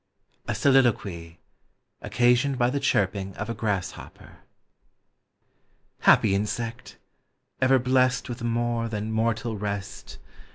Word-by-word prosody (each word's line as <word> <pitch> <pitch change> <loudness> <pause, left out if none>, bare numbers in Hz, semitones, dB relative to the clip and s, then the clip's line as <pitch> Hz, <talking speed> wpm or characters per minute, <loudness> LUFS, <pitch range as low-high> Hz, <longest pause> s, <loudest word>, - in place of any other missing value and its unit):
A - - -1
SOLILOQUY: 100 -11 +1 0.6
OCCASIONED 125 +3 +2
BY 120 -1 +2
THE 140 - -1
CHIRPING 100 -7 0
OF 105 +3 -4
A - - -2
GRASSHOPPER. 105 -5 -5 1.6
Happy 95 - +4
insect! 115 +4 -4 0.6
ever 130 +1 +5
blest 130 0 +1
With 120 -2 -7
a - - -3
more 120 0 -1
than 105 0 -4
mortal 110 0 -1
rest. 100 -1 -6
115 Hz, 110 wpm, -25 LUFS, 105-125 Hz, 1.6 s, ever